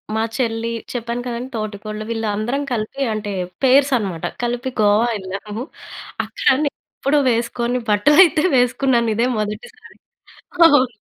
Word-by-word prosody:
మా 220 - +1 0.2
చెల్లి 230 -2 -1 0.2
చెప్పాను 235 0 -3
కదండీ. 245 +2 -4
తోటికోడలు 215 0 -5
వీళ్ళందరం 225 +4 -2
కలిపి 225 +5 -4
అంటే 210 -1 -4 0.3
పేర్స్ 270 +2 +5
అనమాట 190 -7 -4 0.2
కలిపి 240 +2 -2
గోవా 210 +3 +4
వెళ్ళాము. 205 +3 -6 0.6
అక్కడ 480 - +2 0.4
ఎప్పుడో 290 +2 +2
వేసుకొని 235 +1 -1
బట్టలు 210 +9 +4
అయితే 315 -3 +2
వేసుకున్నాను. 245 -1 +2
ఇదే 230 +3 +2
మొదటిసారి. 210 - -7 0.7
అవును. 290 -5 +5
235 Hz, 120 wpm, -20 LUFS, 215-255 Hz, 0.7 s, పేర్స్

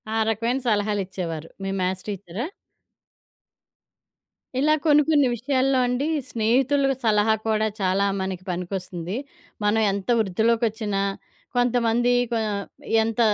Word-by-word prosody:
ఆ 220 - -1
రకమైన 230 +4 0
సలహాలిచ్చేవారు 190 -6 -1
మీ 195 - -2
మ్యాథ్స్ 185 0 -2
టీచరా? 200 +2 -4 2.1
ఇలా 305 +3 +4
కొన్ని 300 -1 +6
కొన్ని 290 -4 +4
విషయాల్లో 260 +2 +1
అండి, 250 +4 0 0.2
స్నేహితుల 260 +5 +2 0.2
సలహా 215 -1 +3
కూడా 220 0 +2
చాలా 190 +1 +2 0.2
మనకి 190 -1 -4
పనికొస్తుంది. 180 0 -4 0.5
మనం 210 +2 +3
ఎంత 200 +3 -4
వృద్ధిలొకొచ్చిన, 220 +1 +1 0.6
కొంతమంది 245 -1 +2 0.2
కొ - - +1 0.7
ఎంత 225 +1 -3
220 Hz, 105 wpm, -24 LUFS, 190-245 Hz, 2.1 s, కొన్ని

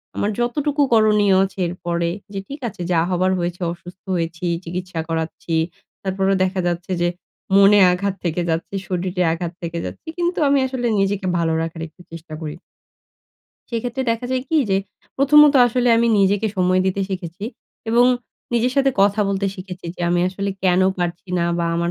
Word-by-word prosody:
আমার 210 - 0
যতটুকু 290 +5 0
করণীয় 210 -3 +4
আছে 195 0 -5
এরপরে 170 -1 -2 0.2
যে, 195 - -3
ঠিক 280 +1 -7
আছে, 180 - -11
যা 165 - +3
হবার 185 +1 +1
হয়েছে, 175 +1 -3
অসুস্থ 175 +2 -13
হয়েছি, 165 +1 -3 0.2
চিকিৎসা 180 0 -5
করাচ্ছি। 165 0 -3 0.5
তারপরেও 195 0 +1
দেখা 185 0 -1
যাচ্ছে 175 +2 -3
যে, 175 - +3 0.5
মনে 200 +1 +7
আঘাত 195 +2 -1
থেকে 170 +1 0
যাচ্ছে, 165 +4 -2
শরীরে 180 0 -2
আঘাত 170 0 -4
থেকে 170 0 -4
যাচ্ছে। - - -8
কিন্তু, 350 0 0
আমি 280 0 +4
আসলে 250 -2 -2
নিজেকে 195 0 0
ভালো 165 -1 +1
রাখার 165 0 -5
একটু 180 - -19
চেষ্টা 160 -1 -9
করি। 155 +1 -5 1.1
সেক্ষেত্রে 245 +3 -2
দেখা 230 +2 -2
যায় 255 -1 0
কি 320 - +3
যে, 190 - +3 0.4
প্রথমত, 295 +1 +6
আসলে 245 +1 +1
আমি 235 0 +3
নিজেকে 200 +2 +3
সময় 185 0 +3
দিতে 190 +1 0
শিখেছি 185 0 -5 0.5
এবং 240 +2 +5 0.5
নিজের 245 +2 +2
সাথে 270 0 +4
কথা 200 +1 +3
বলতে 200 0 0
শিখেছি 185 -2 -8
যে, - - -12
আমি 175 0 +2
আসলে 200 +1 -3
কেন 180 0 +4 0.2
পারছি 175 +1 -3
না? 170 - +1
বা 170 - 0
আমার 170 0 0
190 Hz, 170 wpm, -21 LUFS, 175-225 Hz, 1.1 s, মনে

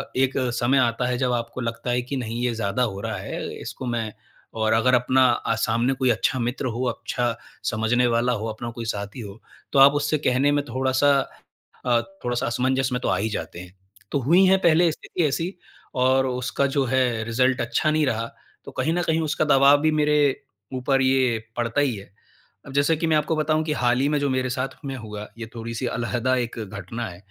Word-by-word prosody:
एक 130 +1 +2 0.2
समय 120 +3 +2
आता 125 -1 +2
है 125 -1 0
जब 125 -1 0
आपको 120 +1 -3
लगता 115 +1 -4
है 125 0 +1
कि 125 +3 -5
नहीं 120 -1 -4
ये 125 -1 +1
ज़्यादा 110 +2 0
हो 100 -5 -2
रहा 110 0 -3
है। 95 - -5
इसको 130 - -7
मैं 115 -3 -2 0.4
और 110 0 +1
अगर 115 +3 +3
अपना 130 +1 +4
अ, 115 -1 -1
सामने 115 +4 +1
कोई 130 -1 0
अच्छा 120 +3 +1
मित्र 120 +3 -2
हो, 120 0 -2
अच्छा 120 0 -2 0.4
समझने 115 +3 +2
वाला 120 +1 +2
हो - - -2
अपना 110 +2 -5
कोई 115 0 -7
साथी 100 +1 -4
हो 105 0 -10 0.3
तो 140 - +4
आप 135 +1 +9
उससे 150 +1 +1
कहने 130 +3 +3
में 145 0 +1
थोड़ा-सा 130 +3 +2 0.7
अ, 120 -2 +3 0.2
थोड़ा-सा 120 0 -1
असमंजस 130 +2 0
में 125 - 0
तो - - -2
आ - - +2
ही 110 +3 -1
जाते 105 - -5
हैं। 90 0 -11 0.4
तो 140 - +1
हुई 170 +9 +5
हैं 190 +1 +5
पहले 170 0 +4
स्थिति 165 - -3
ऐसी 165 +7 -2 0.5
और 130 +1 +4
उसका 125 +2 -1
जो 140 - +3
है 125 -3 +1
रिज़ल्ट 125 +3 +1
अच्छा 120 +6 0
नहीं 155 0 +2
रहा 115 -3 -1 0.4
तो - - -8
कहीं 160 - -1
न 175 - 0
कहीं 160 -1 +1
उसका 155 0 0
दवाब 140 0 +6
भी 155 0 +3
मेरे 150 -1 +2 0.6
ऊपर 135 +1 +1
ये 130 -3 +2 0.2
पड़ता 120 +3 0
ही 135 -5 +1
है। 100 -1 -9 0.6
अब 135 - -10
जैसे 145 +3 +3
कि 165 - -1
मैं 160 -1 +3
आपको 150 +2 0
बताऊँ 155 0 +1
कि 155 - 0
हाल 125 -3 +1
ही 135 - +2
में 150 - +1
जो 140 0 0
मेरे 130 -1 0
साथ 130 +1 -2 0.2
में 135 -1 -4
हुआ 105 -3 -7
ये 115 -1 -6
थोड़ी-सी 115 +1 -4
अलहदा 120 +2 0
एक 120 -1 -3
घटना 105 +2 -5
है। 85 - -10
125 Hz, 215 wpm, -24 LUFS, 115-140 Hz, 0.7 s, आप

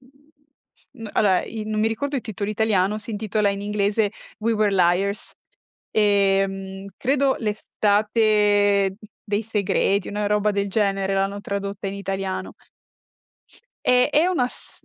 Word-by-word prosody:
mhmm, 280 -3 -17
allora, 190 -4 +3
i 220 -1 -6
non 215 0 -2
mi 220 - +3
ricordo 280 +6 -2
il 255 - -3
titolo 205 -1 -4
italiano, 215 -2 +1
si 215 +2 -8
intitola 210 0 0
in 200 0 -4
inglese: 205 0 0 0.3
"We 225 +1 0
Were 210 -2 +2
Liars". 185 +3 +1 0.6
Ehm, 195 -2 +1
credo 275 +1 +2
"L'Estate 210 -2 +2 0.3
dei 210 0 -1
segreti", 200 -2 0
una 205 0 -2
roba 210 0 +2
del 200 0 -1
genere 195 -2 0
l'hanno 195 +1 -1
tradotta 200 0 -4
in 195 - -5
italiano. 195 -1 -4 1.3
Eh, 250 +2 +4
è 310 +4 +3
una 300 -10 +1
st - - -12
205 Hz, 135 wpm, -23 LUFS, 200-220 Hz, 1.3 s, Eh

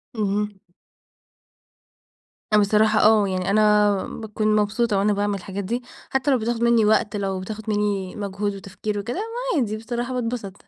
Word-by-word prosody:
اهم. 210 -1 -1 2.0
بصراحة 215 +1 +4
آه 215 -1 +5
يعني 185 0 -2
أنا 210 -1 +3
باكون 215 -1 -1
مبسوطة 210 0 +1
وأنا 210 +1 +2
باعمل 205 0 0
الحاجات 195 +2 -6
دي، 240 +6 -3 0.3
حتى 265 +2 +1
لو 260 - +4
بتاخد 230 +1 -1
مني 235 -2 +4
وقت، 210 0 +2
لو 195 -2 -2
بتاخد 215 +3 -6
مني 205 -3 -1
مجهود 200 0 -3
وتفكير 200 +2 -5
وكده، 235 +4 -4
ما 455 - -2
عادي 215 -3 -1
بصراحة 240 +3 -4
باتبسط، 235 -5 -3
210 Hz, 145 wpm, -23 LUFS, 200-230 Hz, 2.0 s, آه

